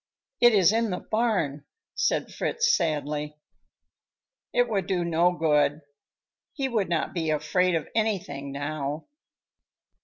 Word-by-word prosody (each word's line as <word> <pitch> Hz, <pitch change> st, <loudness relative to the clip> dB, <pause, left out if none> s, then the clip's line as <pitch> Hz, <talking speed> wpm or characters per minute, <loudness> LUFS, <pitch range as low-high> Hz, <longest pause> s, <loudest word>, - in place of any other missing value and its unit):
"It 240 Hz, -2 st, +6 dB
is 190 Hz, -2 st, +5 dB
in 230 Hz, 0 st, +1 dB
the 180 Hz, -, -3 dB
barn," 205 Hz, -11 st, -1 dB, 0.3 s
said -, -, 0 dB
Fritz 470 Hz, 0 st, +1 dB
sadly. 150 Hz, -1 st, -2 dB, 1.1 s
"It 245 Hz, 0 st, +2 dB
would 195 Hz, -5 st, -1 dB
do 180 Hz, -3 st, 0 dB
no 170 Hz, +1 st, +3 dB
good; 150 Hz, -3 st, +2 dB, 0.7 s
he 275 Hz, -2 st, -2 dB
would 215 Hz, -8 st, -1 dB
not 170 Hz, -2 st, -1 dB
be 165 Hz, -3 st, -2 dB
afraid 165 Hz, +4 st, +1 dB
of 160 Hz, -, -2 dB
anything 175 Hz, -11 st, -2 dB
now. 145 Hz, +1 st, -4 dB
170 Hz, 125 wpm, -26 LUFS, 150-210 Hz, 1.1 s, It